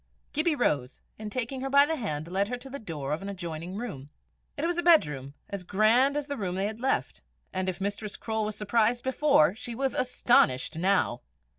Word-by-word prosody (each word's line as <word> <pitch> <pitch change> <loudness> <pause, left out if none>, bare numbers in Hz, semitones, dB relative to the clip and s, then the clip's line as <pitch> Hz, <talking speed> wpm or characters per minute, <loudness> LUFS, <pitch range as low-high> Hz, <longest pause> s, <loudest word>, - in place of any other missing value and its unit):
Gibbie 310 +1 +2
rose, 140 - 0 0.2
and 215 -1 -6
taking 255 +2 -3
her 270 - -2
by 280 +1 +6
the 320 +2 -1
hand, 160 - -3
led 195 +3 0
her 245 +2 -3
to 260 +2 -12
the 280 - -5
door 150 - -4
of 155 - -3
an 200 - -5
adjoining 175 -1 -6
room. 175 - -6 0.5
It 295 - -1
was 345 0 0
a - - +3
bedroom, 150 - +3
as 200 -2 -5
grand 225 +9 +3
as 295 - -2
the 285 -1 -4
room 185 -4 -2
they 190 +1 0
had 215 +2 -4
left, 265 +2 -1 0.3
and 185 0 -1
if 185 - -5
Mistress 205 +1 -3
Croale 220 -1 -2
was 210 0 -3
surprised 230 +3 +1
before, 260 - +4
she 235 +1 -7
was 265 +2 -1
astonished 235 - +2
now. 180 -8 +1
215 Hz, 205 wpm, -28 LUFS, 180-260 Hz, 0.5 s, by